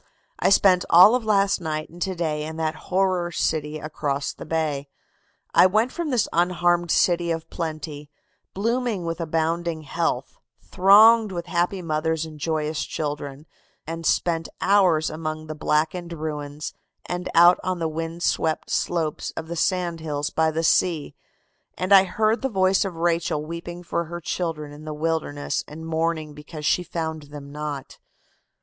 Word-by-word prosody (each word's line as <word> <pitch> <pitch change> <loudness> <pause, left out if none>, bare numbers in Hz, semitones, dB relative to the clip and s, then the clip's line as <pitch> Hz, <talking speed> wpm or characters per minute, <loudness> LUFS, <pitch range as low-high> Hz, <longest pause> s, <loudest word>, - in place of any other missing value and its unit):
"I - - +3
spent 190 -2 +5
all 180 +6 +8
of 250 -1 +1
last 200 -3 +2
night 155 -2 -3
and 175 +1 -13
to 190 0 -1
day 155 -3 -2
in 160 +1 -6
that 160 -1 -1 0.2
horror 185 -2 +1
city 155 -2 -1
across 145 -2 -3
the - - -10
bay. 150 -3 -1 0.7
I - - +7
went 215 +6 +1
from 340 -3 -3
this 245 -5 +1
unharmed 175 0 +2
city 175 +1 +2
of 165 -1 -2
plenty, 155 -3 -5 0.5
blooming 230 -2 -1
with 165 +1 -3
abounding 165 0 -1
health, 145 - -2 0.2
thronged 215 +3 +6
with 170 -2 -4
happy 175 +2 -1
mothers 160 0 -1
and 155 -1 -11
joyous 155 0 -1
children, 145 -1 -5 0.4
and 165 +1 -5
spent 165 -1 +1
hours 185 -6 +3
among 155 0 -4
the 155 - -5
blackened 160 +3 -1
ruins 150 -2 -5 0.3
and 180 0 -4
out 175 +1 +7
on 185 -1 -1
the 165 -1 -1
windswept 165 0 -2
slopes 165 -3 -1
of 160 - -5
the 170 - -3
sand 175 -1 0
hills 150 -2 -3
by 160 0 +2
the 160 +1 -2
sea, 165 -2 +2 0.6
and 185 +2 +1
I 195 -1 +8
heard 215 +4 +1
the 270 - 0
voice 190 -3 +3
of 195 -4 -4
Rachel 165 -2 0
weeping 170 +2 -7
for 170 0 -2
her 170 +2 -6
children 160 -3 -3
in 145 +1 -11
the 155 -1 -5
wilderness 155 -2 -2
and 160 +2 -9
mourning 160 -1 -1
because 150 +1 -9
she 180 - +3
found 160 -3 -4
them 145 -1 -9
not. 150 -2 -6
165 Hz, 160 wpm, -24 LUFS, 155-180 Hz, 0.7 s, all